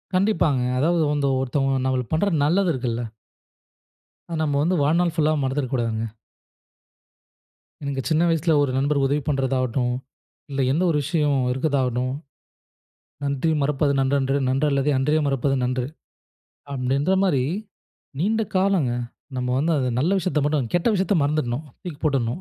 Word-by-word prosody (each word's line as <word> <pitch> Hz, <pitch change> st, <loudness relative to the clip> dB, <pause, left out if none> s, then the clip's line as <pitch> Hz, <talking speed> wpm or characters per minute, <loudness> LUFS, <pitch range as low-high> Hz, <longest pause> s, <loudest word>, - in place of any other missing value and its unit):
கண்டிப்பாங்க. 180 Hz, -9 st, +2 dB, 0.2 s
அதாவது 165 Hz, +3 st, +2 dB
அந்த 145 Hz, -1 st, 0 dB
ஒருத்தவங்க 135 Hz, +1 st, 0 dB
நம்மளுக்கு 130 Hz, -1 st, -1 dB
பண்ற 180 Hz, +6 st, +2 dB
நல்லது 180 Hz, +5 st, +2 dB
இருக்குல்ல. 120 Hz, -2 st, -2 dB, 1.3 s
அத 165 Hz, -, -3 dB
நம்ம 145 Hz, -2 st, +1 dB
வந்து 180 Hz, +4 st, +1 dB
வாழ்நாள் 170 Hz, +3 st, +2 dB
ஃபுல்லா 155 Hz, -1 st, +2 dB
மறந்துட 135 Hz, +1 st, -1 dB
கூடாதுங்க. 115 Hz, -3 st, -1 dB, 1.8 s
எனக்கு 140 Hz, -1 st, -2 dB
சின்ன 160 Hz, +1 st, +3 dB
வயசுல 165 Hz, 0 st, +2 dB
ஒரு 140 Hz, -, 0 dB
நண்பர் 140 Hz, +2 st, +1 dB
உதவி 145 Hz, +2 st, +1 dB
பண்றதாகட்டும். 130 Hz, -3 st, 0 dB, 0.6 s
இல்ல 135 Hz, -1 st, -1 dB
எந்த 160 Hz, +6 st, +1 dB
ஒரு 155 Hz, -, +2 dB
விஷயம் 150 Hz, -2 st, +1 dB
இருக்கதாகட்டும். 130 Hz, -2 st, 0 dB, 1.1 s
"நன்றி 140 Hz, +3 st, 0 dB
மறப்பது 140 Hz, 0 st, +1 dB
நன்றன்று 135 Hz, 0 st, +1 dB
நன்றல்லதே 140 Hz, +1 st, +1 dB
அன்றே 150 Hz, +4 st, +2 dB
மறப்பது 135 Hz, 0 st, +1 dB
நன்று" 125 Hz, 0 st, -1 dB, 0.9 s
அப்படின்ற 140 Hz, +7 st, +1 dB
மாரி, 140 Hz, -10 st, +2 dB, 0.8 s
நீண்ட 220 Hz, +5 st, +1 dB
காலங்க. 185 Hz, -9 st, +2 dB, 0.5 s
நம்ம 125 Hz, 0 st, -2 dB
வந்து 160 Hz, +5 st, +1 dB
அது 130 Hz, -2 st, 0 dB
நல்ல 160 Hz, +7 st, +1 dB
விஷயத்த 170 Hz, -5 st, 0 dB
மட்டும். 145 Hz, -6 st, 0 dB
கெட்ட 175 Hz, +5 st, +2 dB
விஷயத்த 195 Hz, +1 st, +1 dB
மறந்துடணும். 145 Hz, -1 st, -1 dB, 0.2 s
தூக்கி 170 Hz, -5 st, -7 dB
போட்டுணும். 135 Hz, 0 st, 0 dB
140 Hz, 130 wpm, -23 LUFS, 130-160 Hz, 1.8 s, சின்ன